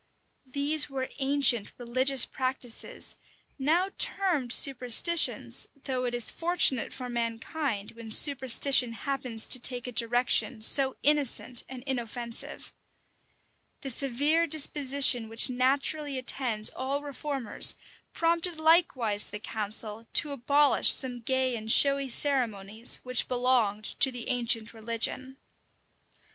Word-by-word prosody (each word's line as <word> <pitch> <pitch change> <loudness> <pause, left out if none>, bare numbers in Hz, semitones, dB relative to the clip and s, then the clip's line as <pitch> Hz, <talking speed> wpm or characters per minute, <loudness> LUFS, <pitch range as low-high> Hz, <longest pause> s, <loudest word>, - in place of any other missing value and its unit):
These 290 +2 +1
were 265 -1 -5
ancient 270 -5 +1
religious 255 +2 +2
practices, 255 -3 -2 0.4
now 340 +8 0
termed 345 -11 0
superstitions; 270 +6 +2 0.2
though 255 -2 -3
it 240 -1 -3
is 240 -2 +3
fortunate 330 -8 +2
for 250 -1 -7
mankind, 230 0 -4
when 230 -1 -12
superstition 260 -1 +2
happens 250 -1 -4
to 255 - +1
take 245 0 -3
a 250 - -6
direction 240 0 +1
so 265 +3 +4
innocent 280 -4 +1
and 255 -2 -10
inoffensive. 240 -3 -5 1.1
The 270 - -2
severe 285 +7 0
disposition 280 -5 +2
which 225 +3 +4
naturally 275 +3 -1
attends 245 -4 -1
all 275 +2 -4
reformers 280 -4 0 0.4
prompted 335 0 -1
likewise 295 - +1
the 210 - -8
council 215 +1 -2
to 300 - +3
abolish 280 +2 +2
some 250 -2 +1
gay 260 +1 -1
and 220 -1 -1
showy 275 +1 +4
ceremonies 230 -5 -1
which 250 -1 0
belonged 245 -4 0 0.2
to 270 - +4
the 245 -2 -6
ancient 235 -2 0
religion. 230 +4 -4
255 Hz, 115 wpm, -27 LUFS, 235-280 Hz, 1.1 s, so